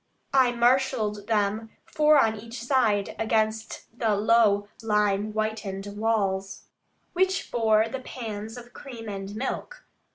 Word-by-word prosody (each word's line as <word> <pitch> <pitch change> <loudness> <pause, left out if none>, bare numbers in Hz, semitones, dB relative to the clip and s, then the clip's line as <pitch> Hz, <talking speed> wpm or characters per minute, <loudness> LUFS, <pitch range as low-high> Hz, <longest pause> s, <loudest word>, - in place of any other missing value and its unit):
I 260 -2 +5
marshalled 235 -4 +1
them, 215 0 0 0.2
four 305 0 +4
on 225 -5 +3
each 230 +2 -8
side, 235 -6 +1
against 220 0 -1
the 225 -3 +1
low 205 -1 +3
lime 210 -1 +1
whitened 215 -2 -3
walls, 195 -3 -1 0.5
which 375 +2 0
bore 220 -2 +3
the 265 +4 -5
pans 225 -3 -7
of 245 0 -12
cream 235 -5 -9
and 195 0 -6
milk. 270 - -5
220 Hz, 125 wpm, -26 LUFS, 210-240 Hz, 0.5 s, I